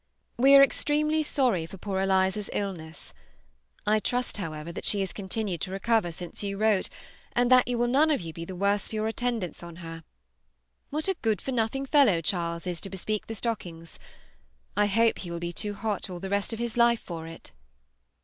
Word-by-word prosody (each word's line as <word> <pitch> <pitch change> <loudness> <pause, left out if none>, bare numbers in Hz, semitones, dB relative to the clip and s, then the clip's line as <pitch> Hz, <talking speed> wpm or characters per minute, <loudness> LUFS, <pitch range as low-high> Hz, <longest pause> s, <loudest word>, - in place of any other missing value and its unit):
We 270 +3 +6
are 275 - +10
extremely 300 +2 +2
sorry 245 - +1
for 195 - -10
poor 190 0 -3
Eliza's 190 +1 +1
illness. 170 -6 -5 0.7
I 215 +1 +3
trust, 245 +3 -1
however, 160 -3 -5
that - - -7
she 205 - +2
has 190 - -2
continued 195 -2 -3
to 185 - -2
recover 195 -1 +1
since 175 +1 -6
you 200 -1 -3
wrote, 215 -2 +2 0.4
and 245 +1 +2
that 255 -1 +7
you 245 -1 0
will 240 - +2
none 280 +6 +4
of 300 - +2
you 165 -2 -7
be 165 - -6
the 185 +2 -7
worse 200 +2 +1
for - - -7
your 215 0 0
attendance 225 -6 -2
on 170 -1 -9
her. 165 -1 -8 0.9
What 305 +4 -1
a 385 - +2
good 220 -2 +1
for 270 - -4
nothing 250 +3 0
fellow 270 - +5
Charles 170 0 -1
is 175 -2 -3
to 195 - -5
bespeak 205 +2 -3
the 225 - -4
stockings! 175 -8 -5 0.8
I 210 0 +3
hope 225 +3 +3
he 180 - -6
will 170 - -4
be 170 0 -4
too 205 +1 -2
hot 205 -1 -2
all 180 -1 -6
the 190 +2 -6
rest 200 +2 0
of 225 - -3
his 235 0 -3
life 235 -1 +4
for 165 -2 -7
it! 165 - -10
205 Hz, 205 wpm, -28 LUFS, 175-235 Hz, 0.9 s, are